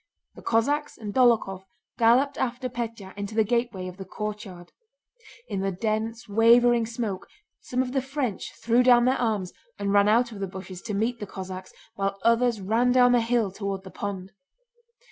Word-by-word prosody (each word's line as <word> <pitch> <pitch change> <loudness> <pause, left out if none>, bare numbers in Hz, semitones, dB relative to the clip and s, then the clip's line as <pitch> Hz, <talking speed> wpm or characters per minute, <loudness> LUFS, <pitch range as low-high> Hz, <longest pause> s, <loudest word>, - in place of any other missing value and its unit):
The - - -13
Cossacks 285 +6 0
and 210 -3 -6
Dólokhov 225 -7 +3 0.4
galloped 250 +5 +4
after 255 +1 -2
Pétya 230 -5 -6
into 205 +1 -6
the 220 - +4
gateway 230 -4 -1
of 180 0 -9
the 195 - -6
courtyard. 195 -3 -7 0.8
In 200 - -3
the 195 0 -1
dense 220 +4 -3
wavering 230 +2 +4
smoke 225 -5 -4 0.3
some 255 +1 -1
of 250 - -6
the 270 0 0
French 265 -5 -3
threw 235 +2 +2
down 245 -1 +5
their 255 0 +2
arms 210 -6 -1 0.2
and 200 0 -1
ran 200 0 +5
out 235 +2 +3
of 210 - -9
the 195 - -2
bushes 185 -1 -9
to 210 - -2
meet 230 +3 -1
the 205 - -6
Cossacks, 185 -1 -7 0.2
while 195 -2 -2
others 230 -1 +3
ran 225 +6 +2
down 245 -1 +5
the 245 -1 +4
hill 230 -3 +1
toward 195 -1 -4
the 190 - -11
pond. 195 -2 -5
225 Hz, 180 wpm, -26 LUFS, 195-240 Hz, 0.8 s, down